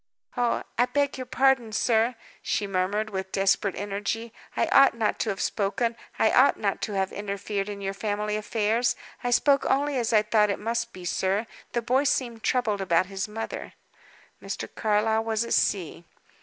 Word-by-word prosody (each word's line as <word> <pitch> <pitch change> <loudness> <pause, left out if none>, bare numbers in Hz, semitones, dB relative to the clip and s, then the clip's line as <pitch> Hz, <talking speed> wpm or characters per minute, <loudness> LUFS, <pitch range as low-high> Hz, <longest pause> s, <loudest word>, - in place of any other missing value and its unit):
"Oh, 245 -2 0 0.2
I 245 - +4
beg 285 0 0
your 255 - -5
pardon, 260 -3 +2
sir," 230 +2 +2 0.3
she 205 - -1
murmured, 200 +3 -1
with 190 -1 -4
desperate 195 0 +1
energy. 205 +3 -3 0.2
"I - - +3
ought 275 -3 +6
not 225 -2 0
to 225 - 0
have 195 - -3
spoken; 230 +3 0 0.2
I - - +3
ought - - +5
not - - -1
to 215 - -3
have 190 -1 0
interfered 200 0 -3
in 200 -1 -6
your 195 0 -2
family 210 +1 -2
affairs. 220 +2 +1 0.3
I 245 - 0
spoke 275 +3 +4
only 280 0 +1
as 235 -1 -1
I 215 -2 +5
thought 215 -1 +3
it 200 - 0
must 230 +2 -2
be, 185 -4 -10
sir. 190 +5 0 0.3
The 235 - 0
boy 260 +5 +2
seemed 240 -5 0
troubled 215 -6 0
about 180 -1 +2
his 195 +1 -2
mother." 225 +1 -6 0.7
Mr. - - -5
Carlyle 220 +1 +1
was 225 0 0
at - - -2
sea. 175 -4 0
215 Hz, 180 wpm, -26 LUFS, 200-235 Hz, 0.7 s, ought